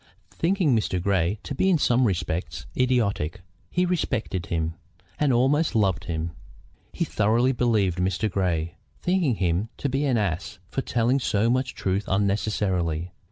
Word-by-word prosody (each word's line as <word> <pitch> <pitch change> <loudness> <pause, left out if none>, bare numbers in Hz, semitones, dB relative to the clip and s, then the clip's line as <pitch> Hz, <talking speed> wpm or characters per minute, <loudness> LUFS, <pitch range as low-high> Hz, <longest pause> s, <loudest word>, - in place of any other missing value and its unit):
Thinking 165 - +2
Mr. 100 -4 0
Grey 95 +1 +1
to - - -5
be 190 +8 +2
in 180 - +4
some 125 -3 +3
respects 85 -4 -2
idiotic, 105 -8 +1 0.3
he 180 +1 +1
respected 120 - -1
him, 80 -1 -1 0.5
and 150 -2 +3
almost 135 +6 +2
loved 95 -6 +2
him. 80 0 -3 0.6
He - - -1
thoroughly 115 +5 +2
believed 110 -8 +1
Mr. 95 +3 +1
Grey, 85 -4 -1 0.3
thinking 175 -9 +2
him 95 +3 0
to 140 - -2
be 135 +3 0
an 130 -4 +2
ass 90 -2 -2
for 135 - -2
telling 120 +2 +1
so 115 -2 +1
much 130 0 0
truth 95 +2 -1
unnecessarily. 95 -4 0
105 Hz, 150 wpm, -25 LUFS, 90-130 Hz, 0.6 s, in